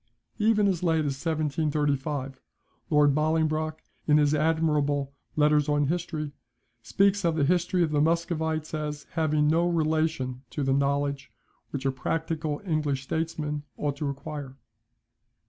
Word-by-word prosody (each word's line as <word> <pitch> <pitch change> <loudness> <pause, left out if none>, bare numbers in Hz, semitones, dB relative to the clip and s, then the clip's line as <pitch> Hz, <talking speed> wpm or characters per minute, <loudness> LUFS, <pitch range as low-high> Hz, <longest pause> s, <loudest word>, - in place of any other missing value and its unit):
Even 210 -1 +3
as 185 -4 0
late 160 -3 +2
as 135 -1 -3
1735, 145 -3 -1 0.5
Lord 150 -2 +5
Bollingbroke, 155 +1 0 0.2
in 150 -1 +5
his 150 -1 +3
admirable 150 -3 +1 0.2
"Letters 150 0 +3
on 145 0 +2
History," 160 -3 -2 0.5
speaks 200 - +2
of 165 -2 +2
the 155 - +1
history 180 +2 +2
of 160 - 0
the 145 -1 +2
Muscovites, 160 -1 0
as 150 -1 -4
having 155 -2 +1
no 165 +3 +3
relation 155 -5 0
to 145 - -3
the 135 0 +2
knowledge 140 0 0 0.4
which 135 -1 -5
a 135 - +3
practical 155 +3 -2
English 150 -5 0
statesman 150 -1 -2 0.2
ought 145 -2 -1
to 145 -1 -2
acquire. 140 -1 -6
150 Hz, 135 wpm, -27 LUFS, 145-160 Hz, 0.5 s, Lord